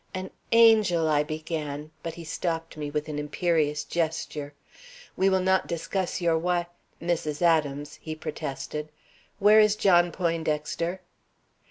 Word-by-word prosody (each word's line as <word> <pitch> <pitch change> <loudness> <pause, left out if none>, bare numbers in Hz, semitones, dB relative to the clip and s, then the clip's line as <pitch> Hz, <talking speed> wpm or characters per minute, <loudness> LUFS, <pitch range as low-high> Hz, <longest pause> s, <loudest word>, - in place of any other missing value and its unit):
"An 185 0 -5 0.2
angel!" 215 -8 +5
I 150 -1 +3
began, 155 -1 -4
but 165 +1 -5
he 170 - -8
stopped 165 0 -3
me 150 -1 -4
with 150 +1 -3
an 150 -1 -4
imperious 150 0 0
gesture. 155 -3 -3 0.6
"We 190 +1 +3
will 190 -1 +2
not 190 0 +2
discuss 175 +3 -2
your 170 -2 +2
wi 175 0 0 0.3
Mrs. 165 -2 -2
Adams," 150 -3 +1
he 155 -1 -5
protested. 150 -1 -5 0.5
"Where 210 +2 +6
is 210 -1 +5
John 175 -4 +4
Poindexter?" 165 +1 -2
165 Hz, 135 wpm, -27 LUFS, 150-180 Hz, 0.6 s, Where